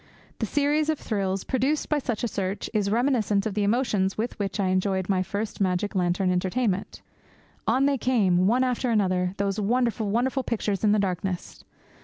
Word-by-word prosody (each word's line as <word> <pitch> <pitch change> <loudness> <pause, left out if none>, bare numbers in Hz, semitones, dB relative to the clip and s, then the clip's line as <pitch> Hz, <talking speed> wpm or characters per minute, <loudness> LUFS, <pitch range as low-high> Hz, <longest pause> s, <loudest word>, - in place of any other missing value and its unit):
The - - -1
series 295 +1 +1
of 310 - +1
thrills 195 -5 -2
produced 270 +4 0
by 300 - +1
such 240 -5 -3
a - - +2
search 195 -2 -3
is 205 -2 +1
reminiscent 220 -4 +1
of 215 - -2
the 210 - -1
emotions 205 -3 +1
with 225 +1 -3
which 200 +1 -2
I 190 -2 +1
enjoyed 185 0 0
my 190 -2 +2
first 205 +3 -4
magic 185 +1 0
lantern 180 0 +1
entertainment. 190 +2 -1 0.6
On 265 +2 +3
they 280 -2 +1
came, 190 -8 +2
one 245 +5 +3
after 250 0 0
another, 185 -4 +1
those 200 +1 -1
wonderful, 230 0 0
wonderful 250 +5 +1
pictures 210 -5 -2
in 210 - +4
the 210 - +4
darkness. 185 -2 -3
205 Hz, 180 wpm, -26 LUFS, 190-245 Hz, 0.6 s, in